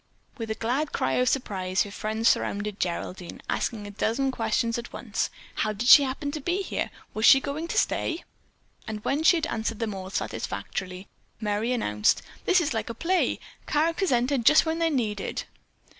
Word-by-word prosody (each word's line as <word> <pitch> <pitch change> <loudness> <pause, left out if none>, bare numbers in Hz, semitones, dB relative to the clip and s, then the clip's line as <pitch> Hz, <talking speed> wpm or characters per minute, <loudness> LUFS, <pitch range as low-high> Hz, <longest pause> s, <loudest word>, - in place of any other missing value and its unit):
With 225 -1 -4
a 220 - -1
glad 255 +7 -1
cry 130 - 0
of 250 - +3
surprise 190 -8 0
her 205 - -9
friends 220 +2 -1
surrounded 205 0 +1
Geraldine, 180 0 -4
asking 215 -3 -2
a 205 - -7
dozen 235 +6 0
questions 230 0 0
at 235 - -8
once. - - -2 0.3
How 215 - 0
did 225 +4 -3
she 285 - +11
happen 280 +1 -2
to 305 0 -5
be 360 +6 -1
there? - - -2 0.2
Was 215 - -3
she 270 - +9
going 290 +4 -4
to - - -3
stay? 330 - 0 0.6
And 215 -1 -5
when 280 +4 +1
she 335 +2 +6
had 320 - -1
answered 225 -4 -2
them 220 -2 -2
all 190 -1 -6
satisfactorily, 185 -1 -4 0.3
Merry 215 +2 -1
announced: 105 - +1 0.2
"This 370 -1 +5
is 310 -6 0
like 225 -1 -2
a 230 - -5
play. 360 +9 +1 0.3
Characters 330 +4 +1
enter 250 +3 +2
just 300 +8 +6
when 320 +1 -1
they're 330 0 +2
needed." 215 -9 -2
230 Hz, 185 wpm, -26 LUFS, 210-290 Hz, 0.6 s, she